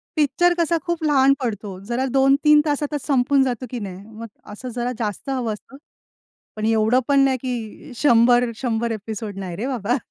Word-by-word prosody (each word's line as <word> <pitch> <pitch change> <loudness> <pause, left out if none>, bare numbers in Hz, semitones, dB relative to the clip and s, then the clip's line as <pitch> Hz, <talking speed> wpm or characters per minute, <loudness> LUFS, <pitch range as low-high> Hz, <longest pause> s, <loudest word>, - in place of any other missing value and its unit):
Picture 350 +4 +3
कसा 335 0 +2
खूप 345 -2 -2
लहान 275 -2 +4
पडतो, 205 -6 -4
जरा 255 +3 0
2-3 280 +3 +4
तासातच 295 -1 -2
संपून 270 0 +3
जातं 255 -1 -2
की 245 - -5
नाही? 195 -1 -7 0.2
मग 230 - -6 0.2
असं 250 +5 -7
जरा 245 0 -2
जास्त 210 +4 -4
हवं 245 -5 -1
असतं. 210 +7 -13 0.8
पण 215 0 -3
एवढं 225 +3 +3
पण 280 -1 +4
नाही, 270 -1 +3
की 245 +1 -6
100 240 -1 +4
100 235 -2 -2
एपिसोड 215 -1 -6
नाही 180 -3 -5
रे 240 +6 -3
बाबा. 245 -2 -1
250 Hz, 170 wpm, -22 LUFS, 220-275 Hz, 0.8 s, लहान